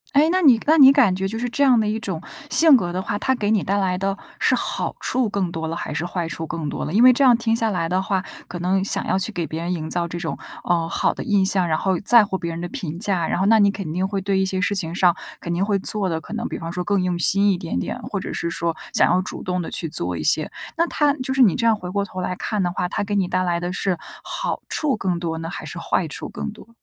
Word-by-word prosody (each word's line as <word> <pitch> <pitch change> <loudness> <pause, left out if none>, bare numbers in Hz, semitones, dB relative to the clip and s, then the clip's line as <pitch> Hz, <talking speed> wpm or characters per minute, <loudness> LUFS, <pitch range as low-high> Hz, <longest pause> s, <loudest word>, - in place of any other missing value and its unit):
诶， 295 +3 +5
那 370 - +2
你 260 -9 +6
那 315 +2 +4
你 270 -3 +9
感 250 -10 +4
觉 190 +1 -2
就 225 +3 -5
是 245 +1 -2
这 285 - 0
样 255 -4 +5
的 215 - 0
一 215 +1 -1
种 190 -7 -4 0.3
性 320 -3 +8
格 175 -8 0
的 180 - -3
话， 205 +2 -3
它 260 - +1
给 210 -3 -1
你 215 -4 +3
带 200 +2 0
来 190 -2 0
的 195 +1 -2 0.2
是 - - +3
好 - - -2
处 250 -3 0
更 195 -4 -2
多 160 -1 -4
了， 165 - -4
还 - - -5
是 - - -2
坏 175 -1 -3
处 160 0 -5
更 160 -3 -4
多 - - -4
了？ 150 - -4
因 215 +7 +4
为 255 0 +8
这 275 +3 +1
样 245 -3 +6
听 230 -1 0
下 225 -1 0
来 170 -4 -1
的 185 +2 0
话， 190 -1 -1 0.2
可 175 - -7
能 190 +2 0
想 - - +1
要 190 - +1
去 205 +4 -1
给 175 -4 -3
别 160 +3 -5
人 175 +1 -3
营 160 -3 -3
造 170 +1 0
这 170 - -6
种， 170 -2 -3 0.3
呃， 170 -2 0
好 - - 0
的 - - -6
印 200 -2 +2
象， 190 -2 +2
然 155 - +1
后 190 -3 0
在 230 +1 +5
乎 190 -2 -3
别 170 - -4
人 165 0 -5
的 175 - -4
评 165 -1 -5
价， 185 -4 0
然 - - -1
后 190 - +1
那 220 +1 +5
你 200 -1 +5
肯 190 -6 -5
定 185 +2 0
会 195 -1 -2
对 195 0 0
一 190 - +2
些 190 0 -2
事 185 +2 0
情 170 -3 -2
上 180 -3 +4 0.2
肯 170 - -4
定 175 +3 0
会 200 0 +1
做 195 0 +2
的， 160 -1 -2
可 195 - -10
能 230 +1 -3
比 - - -5
方 165 0 -6
说， 180 - -3
更 195 0 0
用 180 -1 -1
心 200 +4 +3
一 185 - 0
点 170 - -4
点， 90 - -3
或 - - -4
者 - - -6
是 170 - -2
说 170 -1 -2 0.2
想 - - +4
要 185 +1 +3
主 - - -7
动 180 0 -2
地 - - -5
去 165 - -3
做 90 - +1
一 75 - -4
些。 155 - +2 0.2
那 335 +1 +1
它 295 -2 +2
就 265 -1 -4
是 265 - +6
你 195 - +4
这 230 -2 +1
样 225 - +4
回 180 -4 -7
过 200 +1 0
头 185 -2 -7
来 180 0 -2
看 210 0 -2
的 175 - 0
话， 180 0 -2
它 - - -2
给 205 0 -3
你 195 -3 +1
带 185 +1 0
来 170 -1 0
的 175 +1 -3
是， 190 -1 0 0.3
好 - - -4
处 285 -7 0
更 180 -4 -1
多 165 -2 -3
呢， 165 +1 -5
还 195 - -7
是 155 +3 -7
坏 170 0 -1
处 150 - -5
更 220 0 -5
多？ 220 +1 -15
190 Hz, 325 characters per minute, -22 LUFS, 175-215 Hz, 0.3 s, 你